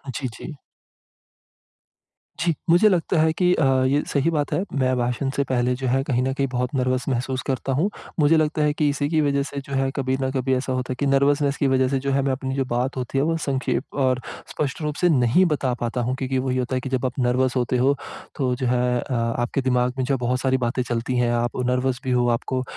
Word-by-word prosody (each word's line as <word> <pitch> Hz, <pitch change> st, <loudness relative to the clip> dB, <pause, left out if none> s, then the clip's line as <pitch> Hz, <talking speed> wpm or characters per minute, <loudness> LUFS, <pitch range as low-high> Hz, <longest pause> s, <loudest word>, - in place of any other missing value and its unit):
जी, 130 Hz, -, -2 dB
जी। 125 Hz, +7 st, -8 dB, 1.9 s
जी। 170 Hz, +1 st, +1 dB, 0.2 s
मुझे 175 Hz, +6 st, +6 dB
लगता 175 Hz, -2 st, +1 dB
है 160 Hz, 0 st, +3 dB
कि 180 Hz, +1 st, +2 dB
अ, 160 Hz, -, +1 dB, 0.2 s
ये 140 Hz, +2 st, +2 dB
सही 140 Hz, +3 st, +1 dB
बात 150 Hz, -3 st, -1 dB
है, 180 Hz, -, +1 dB
मैं 130 Hz, -2 st, +1 dB
भाषण 125 Hz, +2 st, -1 dB
से 140 Hz, -, +1 dB
पहले 125 Hz, -1 st, +1 dB
जो 130 Hz, +1 st, -4 dB
है, 130 Hz, +2 st, +2 dB
कहीं 125 Hz, -3 st, 0 dB
न 130 Hz, -, 0 dB
कहीं 135 Hz, 0 st, 0 dB
बहुत 125 Hz, 0 st, -1 dB
नर्वस 130 Hz, -1 st, 0 dB
महसूस 130 Hz, 0 st, -1 dB
करता 135 Hz, 0 st, -2 dB
हूँ। 160 Hz, +10 st, +1 dB, 0.3 s
मुझे 150 Hz, +2 st, +5 dB
लगता 155 Hz, 0 st, +1 dB
है 150 Hz, 0 st, +2 dB
कि 150 Hz, 0 st, +1 dB
इसी 145 Hz, 0 st, -1 dB
की 160 Hz, -1 st, +2 dB
वज़ह 140 Hz, -1 st, +1 dB
से 140 Hz, 0 st, -6 dB
जो 140 Hz, -, -6 dB
है, 135 Hz, 0 st, +1 dB
कभी 130 Hz, -2 st, 0 dB
न 130 Hz, -, 0 dB
कभी 130 Hz, 0 st, 0 dB
ऐसा 130 Hz, 0 st, -2 dB
होता 130 Hz, 0 st, -2 dB
है -, -, -2 dB
कि 145 Hz, -, 0 dB
नर्वसनेस 140 Hz, +1 st, +2 dB
की 140 Hz, -, +1 dB
वज़ह 130 Hz, -1 st, +3 dB
से 135 Hz, +1 st, 0 dB
जो 140 Hz, +1 st, -2 dB
है, 135 Hz, 0 st, +2 dB
मैं 135 Hz, 0 st, 0 dB
अपनी 130 Hz, 0 st, -3 dB
जो 135 Hz, -1 st, 0 dB
बात 125 Hz, +2 st, -2 dB
होती 130 Hz, +1 st, -3 dB
है, 135 Hz, -, +3 dB
वो 165 Hz, +2 st, +1 dB
संक्षेप 135 Hz, -4 st, -1 dB, 0.2 s
और 130 Hz, -1 st, +1 dB, 0.3 s
स्पष्ट 145 Hz, +1 st, -3 dB
रूप 150 Hz, -1 st, -2 dB
से 180 Hz, -, +4 dB
नहीं 135 Hz, +4 st, +4 dB
बता 145 Hz, -6 st, 0 dB
पाता 120 Hz, +1 st, -1 dB
हूँ, 125 Hz, +2 st, -1 dB
क्योंकि 130 Hz, 0 st, -2 dB
वही 130 Hz, 0 st, -1 dB
होता 130 Hz, +1 st, -1 dB
है 130 Hz, -, -1 dB
कि 135 Hz, -, -5 dB
जब 130 Hz, 0 st, -1 dB
आप 130 Hz, +1 st, -3 dB
नर्वस 125 Hz, +1 st, +1 dB
होते 125 Hz, 0 st, +1 dB
हो, 135 Hz, +3 st, +3 dB, 0.4 s
तो 130 Hz, -4 st, 0 dB
जो 130 Hz, 0 st, -2 dB
है 125 Hz, 0 st, +2 dB, 0.2 s
अ, 130 Hz, -, -5 dB
आपके 120 Hz, +2 st, -1 dB
दिमाग 125 Hz, -1 st, +1 dB
में 130 Hz, -, 0 dB
जो 140 Hz, -, 0 dB
है, -, -, +1 dB
बहुत 125 Hz, +1 st, -1 dB
सारी 130 Hz, 0 st, +2 dB
बातें 125 Hz, 0 st, -1 dB
चलती 120 Hz, +1 st, -2 dB
हैं। 120 Hz, -1 st, +2 dB
आप 120 Hz, 0 st, 0 dB
नर्वस 125 Hz, 0 st, 0 dB
भी 130 Hz, -, -2 dB
हो, 125 Hz, -1 st, +2 dB
आपको 130 Hz, +2 st, -1 dB
130 Hz, 250 wpm, -23 LUFS, 125-140 Hz, 1.9 s, मुझे